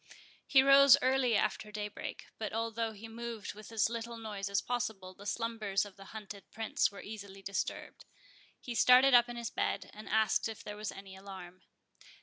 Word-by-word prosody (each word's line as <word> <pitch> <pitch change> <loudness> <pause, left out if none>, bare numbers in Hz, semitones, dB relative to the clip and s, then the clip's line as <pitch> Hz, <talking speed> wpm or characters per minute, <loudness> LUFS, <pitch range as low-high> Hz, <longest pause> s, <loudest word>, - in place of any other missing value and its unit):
He 265 -1 +6
rose 275 0 +8
early 260 -2 +3
after 210 - -1
daybreak; 210 0 -6
but 215 -2 -4
although 225 0 -1
he 220 +1 -10
moved 230 -1 -6
with 215 +2 -12
as 225 -3 +2
little 235 0 -5
noise 205 -3 -5
as - - -11
was 195 - +4
possible, 220 -7 -3
the 200 +2 -11
slumbers 215 -3 -1
of 205 - -12
the 195 - -13
hunted 205 -1 -10
Prince 220 -2 0
were 200 - -10
easily 200 -2 -9
disturbed. 195 +1 -4 0.5
He 245 - -6
started 250 +3 +6
up 240 0 +7
in 240 - -6
his 235 -1 -4
bed, - - -2
and 215 +1 -10
asked 220 0 +2
if 220 - -8
there 210 - -6
was 210 0 -4
any 195 -1 -11
alarm. 190 -2 -10
220 Hz, 185 wpm, -32 LUFS, 200-235 Hz, 0.5 s, rose